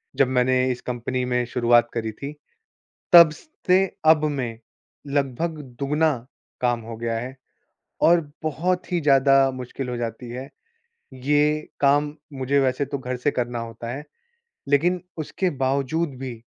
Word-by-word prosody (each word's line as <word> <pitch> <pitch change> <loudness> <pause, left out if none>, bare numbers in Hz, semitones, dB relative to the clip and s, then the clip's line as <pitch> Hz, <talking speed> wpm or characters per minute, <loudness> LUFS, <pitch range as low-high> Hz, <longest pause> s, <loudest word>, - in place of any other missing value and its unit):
जब 135 - +4
मैंने 130 0 +2 0.2
इस 125 - -5
कंपनी 125 +1 -3
में 125 0 0
शुरुआत 120 -1 +3
करी 110 -2 -2
थी। 140 +7 -7 0.8
तब 170 -2 +10 0.4
से 185 +1 +5 0.2
अब 155 -1 +5
में 130 -7 -2 0.5
लगभग 145 +3 -1 0.2
दुगना 150 +3 +2 0.5
काम 120 -1 +1
हो 115 0 -8
गया 115 0 -2
है 130 +3 -6 0.7
और 170 +1 +6 0.2
बहुत 180 +5 -1
ही 175 - +2
ज़्यादा 135 -2 +5
मुश्किल 130 +1 -6
हो 125 - -3
जाती 120 0 -5
है। 130 +3 -6 0.7
ये 150 +3 +1
काम 145 +1 +3 0.2
मुझे 135 +1 0
वैसे 130 +1 +1
तो 140 0 -4
घर 125 -1 -4
से 125 +4 0
करना 120 -2 -2
होता 115 0 -7
है। 145 +4 -6 0.6
लेकिन 170 +6 +2 0.2
उसके 170 +4 -1
बावजूद 140 +3 0
भी 130 -2 -5
135 Hz, 145 wpm, -23 LUFS, 125-150 Hz, 0.8 s, तब